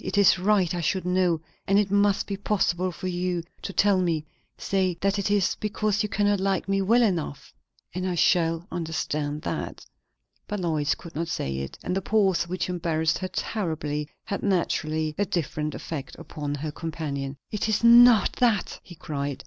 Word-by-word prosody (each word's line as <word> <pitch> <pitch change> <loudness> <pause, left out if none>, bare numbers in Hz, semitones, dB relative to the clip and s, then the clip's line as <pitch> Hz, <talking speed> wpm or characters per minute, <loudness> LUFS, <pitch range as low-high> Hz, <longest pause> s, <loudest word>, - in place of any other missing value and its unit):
"It - - -3
is 195 -2 +5
right 190 -2 +2
I 175 - -2
should 185 +2 -1
know, 180 -3 +2 0.3
and 195 - +4
it 205 -2 +2
must 200 0 +3
be 200 - -3
possible 185 -3 0
for 185 - -9
you 180 -1 -1 0.2
to - - -5
tell 195 -1 +3
me. 165 -4 0 0.3
Say 185 -3 0
that 195 +1 +1
it 200 - -1
is 200 -3 +2
because 210 0 0
you 210 - -1
cannot 205 0 +1
like 195 -1 0
me 195 0 +1
well 230 +5 +4
enough 170 -9 -2 0.4
and 185 +1 -2
I 180 - -1
shall 165 -1 +2
understand 155 -3 -3
that." - - -4 0.6
But 210 -1 -3
Lois 155 -5 0
could 170 - -12
not 165 +2 -2
say 70 - -3
it; 70 0 -5
and 180 - -2
the 195 - 0
pause, 190 -4 +2
which 180 0 -2
embarrassed 165 -3 0
her 185 - -3
terribly, 155 -8 -3
had 200 - -4
naturally 160 -5 0
a 205 - +3
different 155 -3 -2
effect 145 -5 -6
upon 145 -1 -5
her 150 +2 -4
companion. 145 -4 -4
"It 215 +1 -1
is 215 +1 +1
not 235 -3 +7
that!" 230 -5 +1
he 175 - -13
cried. 140 -3 -4
180 Hz, 180 wpm, -26 LUFS, 160-200 Hz, 0.6 s, not